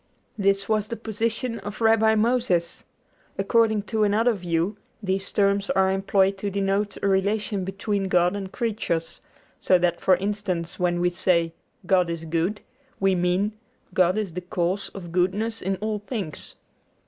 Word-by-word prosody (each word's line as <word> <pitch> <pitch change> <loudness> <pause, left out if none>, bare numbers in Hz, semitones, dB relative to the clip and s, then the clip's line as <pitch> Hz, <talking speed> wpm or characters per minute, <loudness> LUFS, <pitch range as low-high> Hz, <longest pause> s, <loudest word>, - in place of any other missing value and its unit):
This 200 -1 +1
was 215 -1 +1
the 230 - -4
position 230 +2 -2
of 205 0 -7
Rabbi 220 -1 +4
Moses. 220 -7 +1 0.5
According 220 +1 +2
to 215 0 0
another 220 +4 +3
view 175 +1 -1 0.3
these 195 0 -1
terms 200 -1 +2
are 190 0 +3
employed 195 0 +2
to 205 - -2
denote 200 +1 -1
a - - +3
relation 200 +1 +1
between 195 +1 -2
God 180 0 +3
and 195 -2 -5
creatures; 210 -8 -2 0.4
so 185 - +4
that 175 -1 0
for 185 - +5
instance, 190 -3 -3
when 175 -1 +1
we 175 0 +2
say, 170 -2 +1 0.3
God 180 -1 +3
is 165 -1 -4
good, 170 +6 -1 0.4
we 195 0 +3
mean, 180 +3 +1 0.4
God 185 +1 +3
is 205 -6 -2
the 180 - -4
cause 180 +2 -2
of 175 -4 -8
goodness 200 +6 0
in 190 +1 -1
all 210 +2 -3
things. 205 - -6
195 Hz, 155 wpm, -25 LUFS, 180-210 Hz, 0.5 s, for